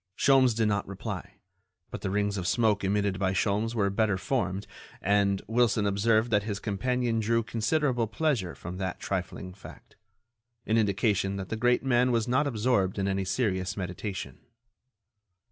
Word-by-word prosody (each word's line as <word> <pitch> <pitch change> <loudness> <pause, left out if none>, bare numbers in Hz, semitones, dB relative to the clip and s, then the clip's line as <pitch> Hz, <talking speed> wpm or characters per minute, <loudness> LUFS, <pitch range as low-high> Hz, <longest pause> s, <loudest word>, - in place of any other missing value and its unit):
Sholmes 130 -4 +4
did 110 -1 +2
not 100 -1 0
reply, 100 -1 -6 0.6
but - - -6
the - - -2
rings 100 +1 0
of 90 -3 -3
smoke 110 -2 +2
emitted 100 -1 0
by 95 -1 +1
Sholmes 105 +4 0
were 100 -3 +1
better 105 -1 +1
formed, 100 -5 -2 0.3
and 100 0 +2
Wilson 110 -2 +2
observed 110 +3 +2
that 105 -1 +4
his 105 -1 -3
companion 115 +3 -1
drew 115 +1 +1
considerable 120 +2 0
pleasure 115 - -1
from 90 +1 -7
that 95 -2 -3
trifling 90 -1 -4
fact—an 115 +3 -9
indication 100 -2 +1
that 95 -1 -5
the - - -2
great 125 +3 +2
man 125 -1 +3
was 115 -1 +1
not 130 +4 +2
absorbed 110 -6 +1
in 100 -1 0
any 95 0 0
serious 95 -3 -1
meditation. 95 +2 -5
105 Hz, 155 wpm, -28 LUFS, 100-115 Hz, 0.6 s, Sholmes